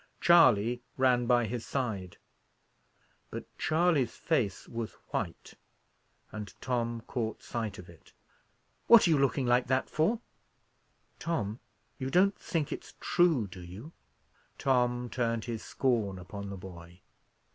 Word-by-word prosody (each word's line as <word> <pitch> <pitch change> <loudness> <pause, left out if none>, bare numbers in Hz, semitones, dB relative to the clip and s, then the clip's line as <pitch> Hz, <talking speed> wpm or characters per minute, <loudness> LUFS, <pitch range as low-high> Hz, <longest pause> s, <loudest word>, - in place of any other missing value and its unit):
Charley 125 -9 +5 0.2
ran 125 -2 +3
by 120 -1 +4
his 115 +1 -4
side. 105 -9 -3 1.1
But - - -6
Charley's 160 -6 +2
face 115 - -1
was 115 -1 -5 0.2
white, - - -4 0.8
and 105 -3 -8
Tom 120 -2 -2
caught 115 -1 -4
sight 110 -4 -4
of 90 - -10
it. 85 -1 -17 0.8
"What 235 -2 +8
are - - +3
you 150 - +4
looking 135 -1 +2
like 125 +1 +3
that 130 +1 0
for?" 185 +10 +2 1.0
"Tom! 115 -10 -2 0.4
you 130 0 -2
don't 190 +6 +4
think 160 -4 -2
it's - - -7
true, 165 -10 +3
do 90 -1 -10
you?" 95 - -10 0.7
Tom 125 -2 +1
turned 115 -2 -1
his 115 -2 -4
scorn 115 -7 0
upon 100 +2 -7
the 100 - -6
boy. 90 -1 -11
120 Hz, 130 wpm, -30 LUFS, 105-135 Hz, 1.1 s, What